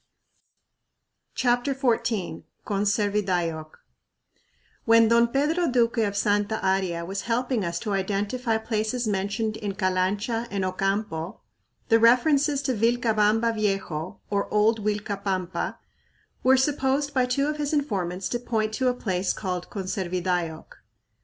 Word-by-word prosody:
CHAPTER 245 +2 +1
XIV 230 -7 -1 0.2
Conservidayoc 195 -6 0 1.2
When 230 0 +6
Don 235 0 +5
Pedro 300 +7 +1
Duque 235 -1 +2
of 200 -2 0
Santa 205 +1 +1
Aria 190 -3 0
was 195 +3 -4
helping 245 -1 0
us 170 -1 -2
to 210 -3 -2
identify 205 +5 -1
places 220 +2 -2
mentioned 210 +2 -1
in 205 -3 -4
Calancha 200 +4 0
and 195 -2 -2
Ocampo, 185 -2 -2 0.5
the 225 -1 +5
references 275 +4 +4
to 260 - 0
"Vilcabamba 225 -1 +2
Viejo," 195 -6 -2
or 200 -1 -1
Old 215 +1 +2
Uilcapampa, 200 -3 -2 0.6
were 260 +1 +5
supposed 280 +1 +1
by 255 -2 +2
two 275 +3 +1
of 300 +1 -2
his 290 -1 -2
informants 195 - -1
to 240 - -1
point 220 -3 -1
to 260 +3 0
a 250 - +2
place 190 -5 -1
called 180 -3 -4
Conservidayoc. 180 -4 -3
215 Hz, 120 wpm, -25 LUFS, 195-245 Hz, 1.2 s, When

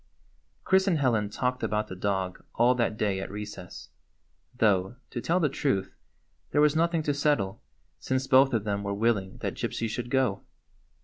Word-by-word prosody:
Chris 190 +1 +3
and 175 -4 +3
Helen 115 -7 +1
talked 125 +4 -2
about 105 -1 -1
the 95 - -7
dog 95 -1 -2
all 120 +2 +4
that 115 -3 0
day 100 -3 0
at 95 - -5
recess; 105 -3 -8 0.7
though, 100 -2 +2 0.2
to 120 - -4
tell 170 +7 +1
the 160 - +3
truth, 130 -7 -1 0.6
there - - +1
was 150 0 +4
nothing 165 0 +2
to 145 - 0
settle, 140 -9 0 0.4
since 130 0 -1
both 135 0 +5
of 115 -5 0
them 100 -1 -1
were 100 0 -3
willing 100 -3 0
that - - -2
Gypsy 115 - -3
should 120 +2 -4
go. 130 -6 +1
115 Hz, 175 wpm, -28 LUFS, 100-135 Hz, 0.7 s, both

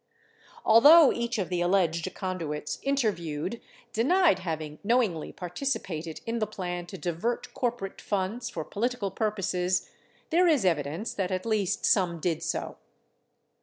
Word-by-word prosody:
Although 285 +7 +8
each 235 0 -2
of 195 -4 -2
the 180 -1 -1
alleged 175 -2 +1
conduits 165 -6 -4
interviewed 205 - -1 0.3
denied 315 - +3
having 155 -4 -5
knowingly 215 -8 +1
participated 180 - -4
in 230 +1 -2
the 215 - 0
plan 175 -2 -5
to 190 - -8
divert 180 +8 -3
corporate 240 -6 -3
funds 205 +5 -2
for 160 - -5
political 225 -2 -2
purposes, 185 -4 -1 0.4
there 350 +2 +4
is 295 - +3
evi 160 -6 +2
dence 165 +11 -4
that 190 -3 -2
at 185 -1 -2
least 215 -5 0
some 175 -4 +2
did 165 -1 -1
so. - - -3
190 Hz, 135 wpm, -28 LUFS, 175-235 Hz, 0.4 s, Although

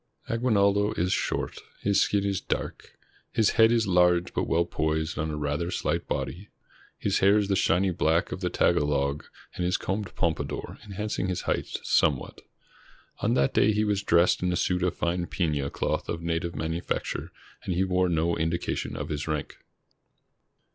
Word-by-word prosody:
Aguinaldo 105 -3 +2
is 90 +2 0
short. - - -2 0.2
His 100 0 +2
skin 100 -1 +1
is 100 -2 -1
dark. - - -4 0.3
His 110 -2 +3
head 115 0 +5
is 115 -1 +3
large, 90 -1 +3
but - - -1
weU 85 +1 +2
posed 80 0 -1
on 80 +1 -1
a 75 - -3
rather 75 +3 -1
slight - - -1
body. 100 +4 -3 0.5
His - - 0
hair 100 +2 +5
is 105 -1 0
the 100 - +3
shiny 95 +1 +2
black 85 -1 +1
of - - -4
the 90 - 0
Tagalog, 75 -5 +1 0.3
and 90 - -3
is 90 +1 +1
combed 100 +1 -3
pompa 85 -3 0
dour, - - -6
enhancing 105 -1 -3
his 90 -2 -2
height - - -2
somewhat. 70 -4 +1 0.8
On - - +1
that 70 0 +2
day 110 - +4
he 105 +1 +1
was 105 -2 +1
dressed 85 -2 +3
in 90 0 +1
a - - 0
suit 90 +1 0
of 90 -1 0
fine 85 +1 -1
pina 75 -6 -1
cloth - - -2
of 85 - -3
native 85 +1 -2
manu 80 +2 -2
facture, - - -3 0.3
and 90 - -2
he 95 - +2
wore 90 -1 +1
no 85 0 +1
indication 80 +1 -2
of - - -5
his 75 +1 -3
rank. 75 -2 -3
90 Hz, 180 wpm, -27 LUFS, 80-100 Hz, 0.8 s, head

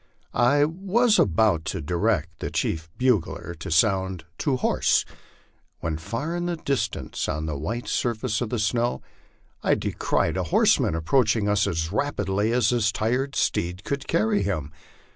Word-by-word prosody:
I 140 +5 +4
was 200 +8 +2
about 95 -2 +3
to - - -3
direct 85 0 -1
the - - -3
chief 80 0 -2
bugler 105 -8 0
to - - -6
sound 95 +1 +2
" - - -42
To 140 -3 +1
horse," - - +2 0.7
when 80 -1 -3
far 115 - -3
in 175 0 -2
the 175 - -1
distance, 140 -4 -2
on 75 0 -2
the 75 -2 -3
white 110 - -4
surface 115 -1 -1
of 120 - -2
the 120 - -1
snow, 115 +3 0 0.6
I - - +3
descried - - -1
a 95 - -1
horseman 80 0 +3
approaching 105 +5 +2
us 105 0 +2
as 80 0 -2
rapidly 105 -4 0
as 120 -3 +3
his 115 -3 +2
tired 125 +6 -1
steed 90 +3 -1
could 140 +2 -3
carry 105 -1 +2
him. 85 -7 -2
105 Hz, 160 wpm, -25 LUFS, 85-125 Hz, 0.7 s, I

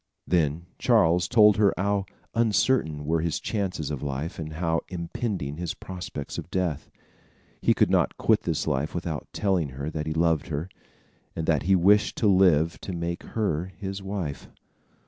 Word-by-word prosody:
Then 85 -1 +1
Charles 85 +1 +3
told 105 -4 +6
her 105 -2 +4
how 100 0 0 0.3
uncertain 110 - +1
were 80 +1 +1
his 85 -1 -1
chances 95 -8 -2
of 70 - -4
life, 70 +3 -4
and 80 -1 -5
how 80 0 0
impending 85 - -3
his 85 -2 -3
prospects 90 -6 -6
of - - -8
death. 85 -5 -2 0.7
He - - +3
could - - +3
not - - +2
quit - - +3
this - - -1
life 70 +3 -1
without 85 -3 -4
telling 95 -7 0
her 70 +3 -3
that 75 -1 -4
he 80 - -1
loved 80 -1 +1
her, 80 +2 -3 0.7
and 80 - -2
that 80 -4 +2
he 95 - +6
wished 100 +4 +4
to 110 - +2
live 90 -5 +4
to 95 - -5
make 85 0 -3
her 90 -7 -1
his 100 -1 -5
wife. 95 -7 -5
85 Hz, 165 wpm, -26 LUFS, 80-95 Hz, 0.7 s, told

